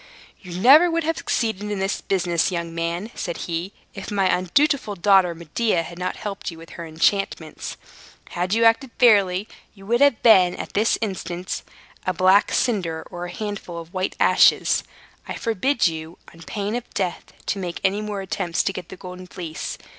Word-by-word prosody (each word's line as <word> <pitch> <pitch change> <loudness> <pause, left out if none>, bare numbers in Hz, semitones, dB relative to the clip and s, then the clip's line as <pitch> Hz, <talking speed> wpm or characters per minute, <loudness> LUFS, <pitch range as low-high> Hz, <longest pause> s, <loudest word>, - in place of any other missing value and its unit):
"You 180 -2 -7
never 290 - +7
would 335 0 0
have 325 +1 -1
succeeded 215 -3 -1
in 205 - -2
this 195 +1 -1
business, 175 -2 0
young 170 -2 -3
man," 170 +6 -3
said 170 - -4
he, 170 +3 -3 0.2
"if 195 - -7
my 195 -3 +2
undutiful 210 - +1
daughter 185 -1 +4
Medea 170 +3 0
had 170 +1 -10
not 180 0 -2
helped 200 -2 -5
you 165 - -9
with 165 0 -13
her 170 -1 -7
enchantments. 160 0 -1 0.5
Had 180 +4 -1
you 230 - +3
acted 230 +4 +4
fairly, 200 -4 +4 0.3
you 195 -1 -14
would 235 +5 +1
have 285 -5 +4
been, 185 -6 +6
at - - -7
this 215 +3 +2
instant, 185 -4 -4 0.4
a 185 - -1
black 190 +2 +4
cinder, 180 -9 0
or 175 0 -5
a 175 - -7
handful 205 -3 -5
of 165 0 -9
white 185 0 -2
ashes. - - +4 0.4
I - - -4
forbid 240 +4 0
you, 160 0 -2 0.2
on 165 - -15
pain 200 +6 -4
of 245 0 -5
death, 185 -3 -3
to 200 - -2
make 175 -2 -4
any 195 +2 +1
more 210 -2 -4
attempts 185 -3 -1
to 195 - -1
get 175 - -7
the 190 - -9
Golden 180 0 -9
Fleece. 165 -3 -6
190 Hz, 185 wpm, -23 LUFS, 175-210 Hz, 0.5 s, never